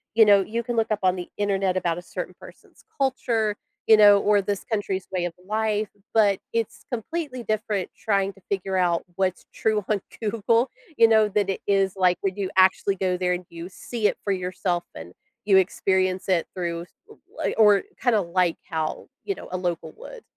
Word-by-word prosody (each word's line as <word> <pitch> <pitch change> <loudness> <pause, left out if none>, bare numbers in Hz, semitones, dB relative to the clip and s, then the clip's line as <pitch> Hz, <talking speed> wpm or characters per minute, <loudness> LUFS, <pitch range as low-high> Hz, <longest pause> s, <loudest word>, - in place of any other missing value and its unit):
you 225 - +8
know, 200 -1 +6
you 230 +4 -3
can 240 +1 -3
look 225 - +1
up 210 - +1
on 185 0 +3
the 180 -1 -6
Internet 195 -2 0
about 170 -2 0
a - - -5
certain 180 +1 -6
person's - - -16
culture, 235 -6 0 0.3
you 220 - +8
know, 205 -1 +8
or 205 0 +3
this 200 0 -3
country's 200 -4 -2
way 180 -2 -1
of 175 - -4
life, 215 0 -1 0.2
but 205 -3 +4
it's 230 -2 -2
completely 255 +2 -4
different 215 -3 -2
trying 195 -2 0
to 195 - -21
figure 195 -1 -1
out 175 -2 +1
what's 185 -1 -1
true 215 -2 0
on 210 -3 +1 0.2
Google, 230 +3 +1 0.3
you 230 - +7
know, 220 -1 +5
that 205 -1 0
it 195 - -2
is, 195 -2 +2
like, 180 -2 +3
when 195 -2 -1
you 200 -2 -3
actually 190 +1 +4
go 185 -1 0
there 180 0 +1
and 180 0 -4
you 170 +1 -8
see 220 +3 -2
it - - -2
for 200 - -1
yourself 180 -1 -2
and 85 +2 -9 0.3
you 200 -2 +4
experience 190 0 +1
it 180 -3 +2
through 170 -2 -3
s 175 - -17 0.2
l 435 - -14 0.2
like - - -1
or 210 -3 +6 0.2
kinda 240 -4 +4
like 175 -1 0
how, 160 -2 -3 0.2
you 400 - -1
know, - - -10
a - - -3
local 175 -2 -3
would. - - -11
195 Hz, 200 wpm, -24 LUFS, 185-215 Hz, 0.3 s, you